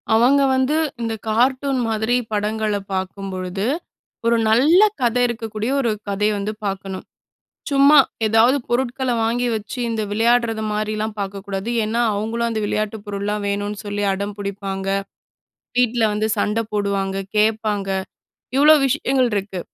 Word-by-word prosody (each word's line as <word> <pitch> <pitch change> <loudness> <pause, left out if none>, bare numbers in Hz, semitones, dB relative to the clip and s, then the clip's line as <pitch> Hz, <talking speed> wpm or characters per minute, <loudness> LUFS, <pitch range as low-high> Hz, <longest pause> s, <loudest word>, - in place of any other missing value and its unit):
அவங்க 255 +5 +5
வந்து 260 +3 +1 0.3
இந்த 230 -1 -2 0.2
கார்ட்டூன் 260 +4 +1
மாதிரி 220 +2 +1 0.2
படங்கள 215 0 -1 0.2
பார்க்கும்பொழுது, 190 0 -4 0.6
ஒரு 235 0 +3
நல்ல 285 +11 +5 0.2
கதை 245 0 +2
இருக்கக்கூடிய, 225 0 -3
ஒரு 235 - +1 0.2
கதய 210 +2 +1
வந்து 205 +2 -3
பார்க்கணும். 195 -1 -4 0.7
சும்மா 280 +2 +6 0.3
ஏதாவது 225 +5 +4
பொருட்கள 255 +1 0
வாங்கி 240 +2 0
வச்சு, 215 +4 -7
இந்த 225 -1 -1
விளையாடுறது 225 +1 +2
மாதிரில்லாம் 215 0 -2
பார்க்கக்கூடாது. 195 +1 -4
ஏன்னா, 225 +2 -1
அவங்களும் 225 +3 -1
அந்த 220 -1 -2
விளையாட்டு 215 +1 -1
பொருள்லாம் 205 +1 -3
வேணும்னு 205 +1 -2
சொல்லி 205 0 -3
அடம் 200 +1 -3
பிடிப்பாங்க. 195 -1 -4 0.9
வீட்டில 245 -1 +2
வந்து 215 +1 0
சண்ட 210 +2 0
போடுவாங்க, 200 -2 -1 0.2
கேட்பாங்க. 210 -2 +1 0.7
இவ்ளோ 300 +2 +7
விஷயங்கள் 265 -2 +1
இருக்கு. 195 -2 -2
215 Hz, 125 wpm, -21 LUFS, 200-240 Hz, 0.9 s, இவ்ளோ